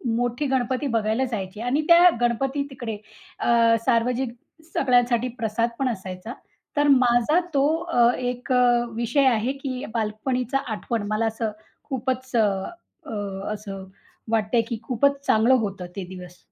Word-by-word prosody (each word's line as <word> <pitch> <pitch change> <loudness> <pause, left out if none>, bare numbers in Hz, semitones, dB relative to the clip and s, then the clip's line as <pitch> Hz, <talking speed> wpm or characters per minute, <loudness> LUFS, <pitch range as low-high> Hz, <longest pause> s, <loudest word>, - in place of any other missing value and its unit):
मोठी 245 +4 -1
गणपती 260 +1 0
बघायला 225 +1 0
जायचे 205 -4 -5
आणि 250 +6 +1
त्या 345 +1 +8
गणपती 265 +4 0
तिकडे 235 -5 -5 0.4
अ, 230 -1 +4
सार्वजनिक 240 +1 +1 0.4
सगळ्यांसाठी 245 -2 +2
प्रसादपण 235 +4 -1
असायचा. 190 +1 -6 0.4
तर 290 0 +3
माझा 255 +3 +4
तो 275 0 +3 0.2
अ, 335 -7 -1 0.2
एक 250 +1 -4
अ, 245 -1 +4
विषय 240 +5 +1
आहे 235 +1 +2
की 255 -2 -3
बालपणीचा 240 +3 -1 0.2
आठवण 220 0 -3
मला 215 +2 0
असं 225 -1 -2 0.4
खूपच 260 -1 -3
अ, - - +5 0.6
अ, 280 - -7 0.4
असं 200 -2 -7 0.5
वाटतंय, 225 +1 +2
की 235 - -2
खूपच 280 +3 +1
चांगलं 225 +4 +4
होतं 200 -6 -2
ते 195 - -4
दिवस. 180 -1 -10
240 Hz, 135 wpm, -24 LUFS, 220-260 Hz, 0.6 s, त्या